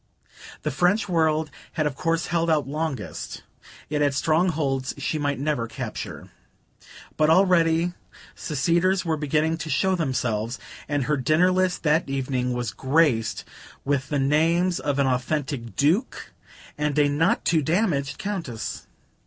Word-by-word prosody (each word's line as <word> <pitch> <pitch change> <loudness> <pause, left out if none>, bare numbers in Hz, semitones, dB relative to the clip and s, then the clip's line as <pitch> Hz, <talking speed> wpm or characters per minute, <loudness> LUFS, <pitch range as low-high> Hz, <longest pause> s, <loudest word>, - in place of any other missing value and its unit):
The - - -1
French 180 - +2
world 160 -3 +1 0.2
had 155 - 0
of 150 - 0
course 165 +3 -1
held 170 -1 0
out 155 -3 +2
longest; 145 - -4 0.4
it 150 -1 -1
had 145 -2 +2
strongholds 155 -4 +1
she 150 +2 -2
might 145 -1 -1
never 140 -4 -1
capture. - - -6 0.9
But 155 0 +3
already 170 -1 +4 0.4
seceders 170 +6 +1
were 165 -1 +1
beginning 155 +2 0
to 160 - -6
show 190 +7 +2
themselves, 125 - -1 0.3
and 145 -2 0
her 150 +3 0
dinner 155 +8 +3
list 185 -1 0
that 155 -1 +2
evening 130 -2 -1
was 120 -3 -2
graced 135 -3 +1 0.4
with 140 -1 0
the 145 - 0
names 165 +6 +2
of 145 -1 -1
an 140 - +3
authentic 130 -1 -2
Duke 170 - 0 0.5
and 150 -1 0
a 145 -1 +5
not 145 +3 +1
too 165 -2 +3
damaged 150 -4 0
Countess. 165 - -5
150 Hz, 140 wpm, -24 LUFS, 135-165 Hz, 0.9 s, a